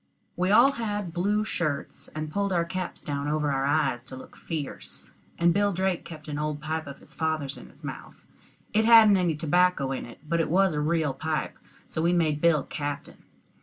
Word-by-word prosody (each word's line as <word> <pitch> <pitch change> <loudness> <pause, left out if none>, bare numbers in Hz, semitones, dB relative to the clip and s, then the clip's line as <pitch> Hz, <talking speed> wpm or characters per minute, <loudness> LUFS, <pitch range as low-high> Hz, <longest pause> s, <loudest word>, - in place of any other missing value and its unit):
We 180 +1 0
all 220 +7 +7
had 205 -8 -3
blue 205 +4 +1
shirts, 150 -8 -3
and 155 0 -4
pulled 200 +3 0
our 170 -2 +2
caps 185 +1 -5
down 140 -1 -3
over 150 -1 0
our 135 0 0
eyes 140 -4 +1
to 130 - -5
look 130 - -12
fierce. 155 -4 -6 0.3
And 170 0 +4
Bill 205 +2 +2
Drake 190 -1 -1
kept 155 -2 -10
an 150 -1 -3
old 150 -1 -2
pipe 155 +1 -3
of 140 - -8
his - - -16
father's 155 -3 -1
in - - -11
his - - -22
mouth; - - -8 0.5
it 215 +1 +4
hadn't 220 -3 +8
any 175 -4 +1
tobacco 160 -2 +2
in 135 - -4
it, 120 - -12
but 170 +1 +1
it 165 - 0
was 190 +1 +3
a 150 - -1
real 155 -2 +1
pipe, 155 +3 -2 0.3
so 160 - -3
we 170 +2 +3
made 155 -4 +1
Bill 165 -4 +4
captain. 145 -1 -5
160 Hz, 205 wpm, -27 LUFS, 150-180 Hz, 0.5 s, hadn't